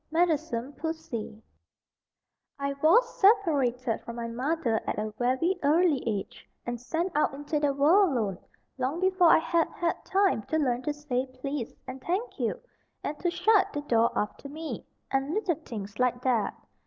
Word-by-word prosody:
Meddlesome 310 -6 0
Pussy 285 -9 -5 1.1
I 280 0 -2
WAS 465 +11 +4
separated 280 - +3
from 235 - -8
my 235 -1 -4
mother 245 -1 0
at - - -1
a 215 0 -2
very 260 +10 +1
early 305 -1 +3
age, 205 -4 -3 0.2
and 240 -1 -4
sent 335 +8 -2
out 295 -2 +2
into 290 +2 -2
the 290 -1 +2
world 320 +7 +4
alone, 200 -5 -2 0.4
long 265 +6 -1
before 370 -2 +4
I - - +8
had 330 0 +1
had 340 -1 -2
time 385 - +2
to 315 - 0
learn 250 -5 +1
to 295 +2 -2
say 270 -3 -2
"please" 255 -1 -5
and 260 0 -8
"thank 385 - -2
you," - - -1 0.4
and 295 +1 -4
to 350 - +1
shut 375 +4 +3
the 290 - -2
door 235 -5 +3
after 210 +6 -3
me, 315 +2 -6 0.2
and 270 +3 0
little 410 -5 +1
things 205 -4 -7
like 250 0 +1
that. 235 -6 +1
285 Hz, 165 wpm, -28 LUFS, 245-335 Hz, 1.1 s, I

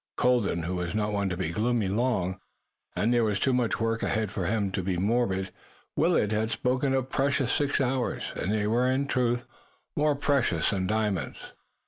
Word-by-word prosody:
Colden 115 -9 +2
was 90 +1 -3
not 105 -1 0
one 100 -1 0
to 90 - -3
be 90 -3 -2
gloomy 110 +2 +1
long, 95 -3 0 0.6
and 115 +3 +2
there 120 -1 +3
was 105 -3 0
too 130 - +2
much 125 -2 +1
work 115 0 0
ahead 110 -3 0
for 95 -4 -2
one 100 -2 0
to 95 - -1
be 90 0 -1
morbid. 95 -2 0 0.4
Willet 160 - +2
had 110 +1 0
spoken 130 +3 0
of 130 - +1
the 130 - -15
precious 135 -2 +1
six 145 -2 +1
hours 130 -1 -1
and 95 - -2
they 105 -1 +1
were, 120 +4 +2
in, 135 +2 +1
truth, 120 -3 0 0.5
more 150 0 +2
precious 135 - +1
than 95 -3 -1
diamonds. 105 -8 -2
110 Hz, 185 wpm, -27 LUFS, 100-125 Hz, 0.6 s, there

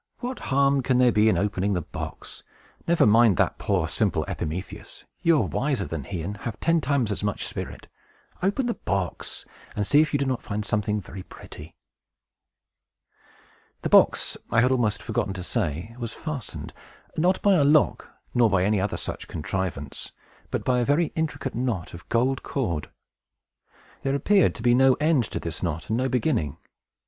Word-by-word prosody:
What 250 +1 -5
harm 140 0 +3
can 130 0 +1
there 125 -1 +5
be 110 0 +4
in - - +2
opening 100 0 0
the 90 -3 -1
box? - - -7 0.5
Never 170 0 +4
mind 110 -2 +5
that - - +1
poor, - - 0
simple - - 0
Epimetheus! 85 +5 -5 0.2
You 165 -2 +4
are - - +1
wiser 135 -8 -1
than 80 -6 -5
he, 90 -2 -4
and 100 +4 -4
have 110 0 -6
ten 165 -1 +2
times 130 -5 +1
as 100 - -3
much 105 0 -1
spirit. - - -6 0.5
Open 200 +8 +1
the 240 - 0
box, 95 - -3 0.3
and 105 - 0
see 145 +8 +5
if 155 - 0
you 145 - +2
do 140 - 0
not 130 -2 -1
find 105 0 -4
something 105 -1 0
very 95 +1 -9
pretty!" 80 -3 -12 2.1
The - - -1
box, - - +4
I 115 - +4
had 125 +2 +3
almost 115 -5 +1
forgotten 95 - -1
to 90 -1 -5
say, 85 +6 -2
was 115 -2 -4
fastened; 155 -7 -6 0.4
not 180 +4 +2
by 200 - +5
a 165 -6 +4
lock, 150 +1 +3 0.2
nor 120 -2 +4
by 95 -2 +2
any 105 0 +2
other 100 - -1
such - - -5
contrivance, 80 -3 -4 0.4
but - - -2
by 125 -1 +2
a - - +2
very 145 +6 +2
intricate 160 -4 -2
knot 115 -8 -2
of 85 - -11
gold 125 +3 +1
cord. 85 - -2 1.1
There 135 0 0
appeared 195 +7 +3
to 110 - -7
be 120 0 +5
no 130 +1 +5
end 150 -5 +2
to - - -4
this 80 -2 -5
knot, 85 -3 -3
and 110 - +2
no 130 +1 0
beginning. 120 - 0
115 Hz, 180 wpm, -25 LUFS, 95-140 Hz, 2.1 s, there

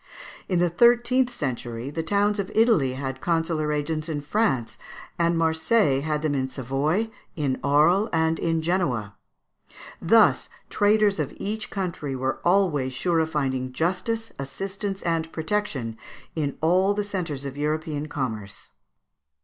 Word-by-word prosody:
In 180 - +1
the 175 +1 +3
thirteenth 240 +5 +4
century 125 - -4
the 165 - -2
towns 205 +4 +1
of 195 -1 -3
Italy 220 - +4
had 130 0 -5
consular 165 -2 0
agents 155 +2 -2
in 150 -2 -2
France; 145 - 0 0.4
and 170 0 +2
Marseilles 160 - +2
had 150 -1 -1
them 155 -2 +1
in 130 -2 0
Savoy, 140 - -1 0.2
in 140 -4 -1
Arles, 155 +9 +4
and 160 -1 +1
in 165 -1 0
Genoa. 130 - -1 0.9
Thus - - +4 0.2
traders 205 -1 +3
of - - -1
each 215 +2 -4
country 170 -8 -3
were 130 +1 -2
always 170 -8 +2
sure 170 +5 +1
of 160 0 +1
finding 130 -4 -2
justice, 185 - -1
assistance, 195 +8 -4
and 165 -1 -1
protection 160 - -2 0.4
in 145 -4 -2
all 185 +5 +3
the 210 - 0
centres 170 -9 -4
of 135 -1 -5
European 150 0 -2
commerce. 110 -9 -5
160 Hz, 140 wpm, -25 LUFS, 140-195 Hz, 0.9 s, thirteenth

